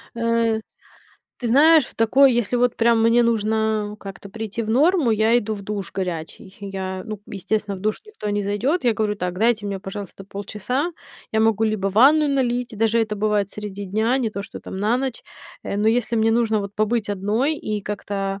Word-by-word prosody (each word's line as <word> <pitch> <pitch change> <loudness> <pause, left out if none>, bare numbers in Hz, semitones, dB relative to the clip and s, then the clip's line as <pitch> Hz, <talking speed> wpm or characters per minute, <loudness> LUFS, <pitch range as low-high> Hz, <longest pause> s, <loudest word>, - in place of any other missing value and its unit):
Э. 230 -1 +1 0.8
Ты 240 - -3
знаешь, 305 +5 +6
в - - -13
такой 255 +4 +5
если 240 0 0
вот, 245 0 +2
прям, 230 -1 +3
мне 230 +1 +4
нужно 220 -2 0
как-то 195 0 -9
прийти 220 +1 -4
в 220 - -3
норму, 295 +2 +3
я 220 +2 +3
иду 220 -2 -1
в 200 - -8
душ 200 -3 -5
горячий. 185 +1 -5
Я 190 -1 -5
ну, 215 -2 -6
к - - -36
естественно, 200 +1 -2
в - - -11
душ 215 +2 0
никто 425 - -5
не 205 0 0
зайдёт. 240 - 0
Я 235 -2 +3
говорю, 215 -1 -1
так, 180 -1 -3
дайте 225 -1 +2
мне, 195 -1 -3
пожалуйста, 195 0 -8
полчаса. 210 - -3 0.4
Я 220 - +2
могу 225 0 +3
либо 215 -3 0
ванную 285 +9 +5
налить, 250 -3 0
даже 225 +1 +2
это 215 -1 -1
бывает 205 -1 0
среди 205 -1 -6
дня, 220 +6 +1
не 235 -4 -1
то, 200 -1 -5
что - - -9
там 190 - -7
на 215 +4 +2
ночь. 260 -1 -3 0.4
Э, - - -4
но 210 +2 +2
если 235 0 +1
мне 225 0 +3
нужно, 225 -2 +2
вот, 200 0 -6
побыть 215 0 0
одной 215 +10 0
и 210 -1 -3
как-то 195 -1 -4
215 Hz, 200 wpm, -22 LUFS, 200-235 Hz, 0.8 s, знаешь